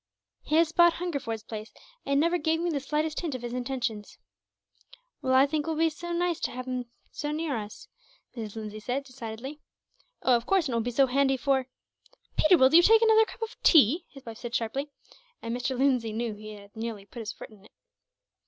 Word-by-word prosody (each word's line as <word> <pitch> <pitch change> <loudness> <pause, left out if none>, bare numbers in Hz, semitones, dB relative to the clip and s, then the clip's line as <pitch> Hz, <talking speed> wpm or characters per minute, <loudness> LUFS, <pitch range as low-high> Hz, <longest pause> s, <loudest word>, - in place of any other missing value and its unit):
"He 305 - -1
has 325 0 +4
bought 345 0 +5
Hungerford's 280 -11 -4
place, 215 0 -7 0.4
and 280 0 +2
never 340 +3 +2
gave 320 +1 +1
me 345 0 0
the 290 - -1
slightest 300 +3 -1
hint 320 -6 -3
of 250 - -7
his 240 0 -4
intentions." 245 -4 -3 1.0
"Well, 260 0 +1
I 265 +1 +7
think 295 +1 -2
it - - -1
will 320 - -1
be 325 0 +3
very 345 +3 -5
nice 350 -1 0
to - - -1
have 255 +1 -6
him 250 -2 -4 0.2
so 295 - -4
near 305 -2 -2
us," 210 -2 -7 0.5
Mrs. 220 -3 -6
Lindsay 215 -1 -6
said, 250 +6 -2
decidedly. 255 +2 -8 0.6
"Oh, 255 - +5
of 235 - -2
course, 385 -4 +3
and 255 - -3
it - - 0
will - - +1
be 240 - -2
so 270 +3 +4
handy 270 +1 +2
for 265 0 +1 0.3
" - - -33
"Peter, 345 +3 +5
will 260 0 +5
you 340 - +9
take 445 +5 +6
another 445 0 +6
cup 455 - -8
of 450 - -5
tea?" 315 - +5
his 275 -2 -14
wife 230 -1 -8
said, 240 0 -5
sharply; 270 +6 -2 0.5
and 230 +1 -4
Mr. 250 +1 -2
Lindsay 250 -5 +1
knew 230 0 -2
that 210 - -13
he 215 0 -8
had 200 0 -14
nearly 220 -3 -5
put 235 - -11
his 220 -2 -5
foot - - -11
in 205 -2 -18
it. - - -19
265 Hz, 225 wpm, -28 LUFS, 230-315 Hz, 1.0 s, you